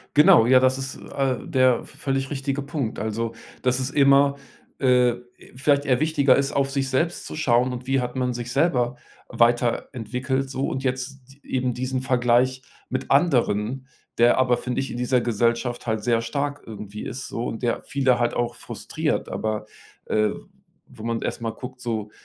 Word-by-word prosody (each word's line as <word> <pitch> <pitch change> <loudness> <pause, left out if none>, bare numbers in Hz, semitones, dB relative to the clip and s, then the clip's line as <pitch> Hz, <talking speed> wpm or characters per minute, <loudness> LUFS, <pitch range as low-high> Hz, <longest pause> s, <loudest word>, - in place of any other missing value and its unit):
Genau, 145 -6 +7
ja, 130 +1 +7
das 130 0 +3
ist 135 0 -6
a 135 -2 +1
der 130 0 +2
v - - -15
völlig 135 -1 -1
richtige 140 0 -2
Punkt. 140 -5 -3
Also, 110 +2 -2 0.3
dass 125 0 +2
es 130 +1 -2
immer, 140 0 +4 0.4
äh, 125 -2 +4 0.4
vielleicht 140 +2 +2
eher 130 -1 +2
wichtiger 150 -4 +4
ist, 140 0 0
auf 135 -1 +1
sich 135 -1 -1
selbst 165 +7 0
zu - - -7
schauen 125 -3 +2
und 125 +1 -7
wie 135 0 +2
hat 125 +1 -4
man 125 -1 0
sich 120 0 -5
selber 125 -4 +1 0.3
weiterentwickelt 125 +2 0
so. 135 0 -2
Und 130 - -3
jetzt 130 +1 -3
d 140 - -22
eben 125 -2 0
diesen 130 +1 -2
Vergleich 125 0 +2 0.3
mit 130 +1 -4
anderen, 130 -4 +2 0.3
der 120 +2 +5
aber, 130 -1 +3
finde 125 +2 -2
ich, 135 - -4
in - - -5
dieser 125 +1 +1
Gesellschaft 120 +1 0
halt 110 -1 -1
sehr 115 +1 +2
stark 145 +4 -3
irgendwie 105 -1 -8
ist 130 +2 -6
so 115 - -3
und 115 - -5
der 120 -1 0
viele 135 -3 +2
halt 120 0 +1
auch 120 0 -1
frustriert. - - -3
Aber, 110 -1 -3 0.4
äh, 105 -1 +2 0.6
wo 110 - -12
man 115 0 -2
erst - - -3
mal 115 -1 -2
guckt 125 +1 -9
so, 110 -4 -3
125 Hz, 180 wpm, -24 LUFS, 120-135 Hz, 0.6 s, Genau